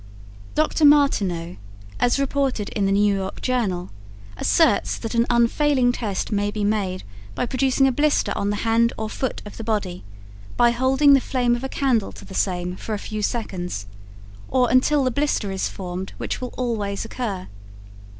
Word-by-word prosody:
Dr. 310 +1 +1
Martinot, 200 - +3 0.4
as 245 - +2
reported 275 -6 0
in 200 -3 0
the - - +1
New 205 +1 +3
York 190 0 -4
Journal, 205 -9 -1 0.4
asserts 300 - +2
that 225 0 -5
an 235 0 +2
unfailing 245 +2 +3
test 215 -5 -3
may 205 0 +1
be 210 0 -3
made 200 -3 -1 0.3
by - - 0
producing 265 +2 +2
a 265 - +4
blister 290 +3 +1
on 200 - -1
the 205 - 0
hand 230 +1 +3
or 220 0 -4
foot 260 - -3
of 210 - -10
the 225 - -6
body 205 -5 -2 0.5
by 240 -1 +5
holding 265 +4 +4
the 270 - +5
flame 245 -2 +1
of 240 - -6
a 265 - -3
candle 250 -8 0
to - - -12
the - - -11
same 180 -1 -1
for 215 +3 -4
a - - -3
few 215 +1 -5
seconds, 180 - -3 0.6
or 250 -2 +2
until 275 +3 +4
the 255 - +1
blister 265 -6 0
is 190 - -1
formed 185 0 -6
which - - -4
will 250 - -6
always 220 -5 -2
occur. 210 -6 -4
230 Hz, 175 wpm, -23 LUFS, 200-260 Hz, 0.6 s, by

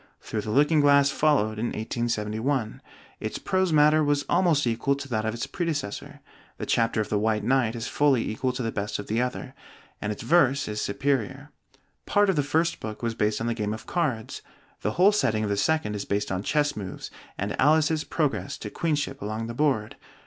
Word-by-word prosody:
'Through 110 - -3
the 105 - -6
Looking 150 +6 +4
Glass' 140 -1 +5
followed 110 -10 +2
in 120 - 0
1871; 110 +2 -2 0.4
its 110 - -4
prose 190 -2 0
matter 155 0 +5
was 145 -1 +1
almost 170 -6 +3
equal 120 +4 +1
to 140 0 -7
that 110 -4 -1
of 110 +1 -1
its 120 - -3
predecessor, 145 - -4 0.4
the - - -4
chapter 115 -1 +1
of 105 - -4
the 105 - +1
White 105 -1 0
Knight 120 -1 +2
is 115 +1 -4
fully 140 -5 +2
equal 125 +4 -1
to 125 - -3
the 115 - -1
best 105 0 -3
of 105 - -6
the 110 +3 0
other, 125 +1 -4 0.5
and 105 - -2
its 105 - -6
verse 140 -5 +3
is 105 0 -3
superior. 135 +4 -1 0.6
Part 205 -1 +4
of - - -3
the 145 - +3
first 160 +4 0
book 110 +1 -7
was 115 -1 0
based 105 -1 0
on - - -1
the 120 - 0
game 105 -2 -2
of 110 - -11
cards; 135 -11 -2 0.4
the 105 - -1
whole 190 +4 +5
setting 115 - +1
of 105 - -1
the - - +1
second 155 0 0
is 100 - -3
based 100 0 -1
on 95 0 -1
chess 145 +6 +1
moves, 95 -3 -7 0.3
and 100 +1 -2
Alice's 155 +2 +3
progress 125 - -2
to 105 - -7
queenship 145 -4 -2
along 110 +2 -3
the 115 - -5
board. 125 -6 0
125 Hz, 205 wpm, -26 LUFS, 110-145 Hz, 0.6 s, Glass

